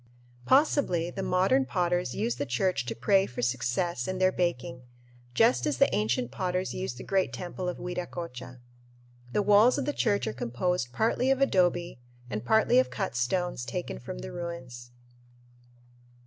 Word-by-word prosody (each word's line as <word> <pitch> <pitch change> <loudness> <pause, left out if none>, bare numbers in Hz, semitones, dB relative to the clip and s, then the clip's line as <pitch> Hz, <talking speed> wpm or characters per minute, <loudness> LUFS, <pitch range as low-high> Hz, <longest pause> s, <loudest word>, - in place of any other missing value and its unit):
Possibly 260 - +3
the 195 - -5
modern 190 +10 +2
potters 175 -6 0
use 120 +1 -1
the 145 - -2
church 125 +2 0
to 115 - -3
pray 190 - +3
for 120 0 -5
success 125 +4 -1
in 185 - -2
their 185 0 +3
baking, 125 -9 -2 0.5
just 125 +2 +3
as 145 -3 0
the - - +3
ancient 120 +3 0
potters 185 0 -2
used 185 -10 -4
the - - -8
great 190 -1 0
temple 180 0 -4
of 180 - -5
Viracocha. 170 -8 -6 0.7
The 205 - +1
walls 210 +6 +5
of 280 - -1
the 290 - -1
church 205 -7 +1
are 110 - -2
composed 125 +4 -2
partly 230 - +1
of 270 0 +3
adobe 175 - +1 0.3
and 105 +1 -3
partly 220 - +4
of 260 - +2
cut 195 - -3
stones 125 +4 -1
taken 60 - -5
from - - -7
the 60 +1 -7
ruins. 130 -8 -7
175 Hz, 160 wpm, -28 LUFS, 125-190 Hz, 0.7 s, walls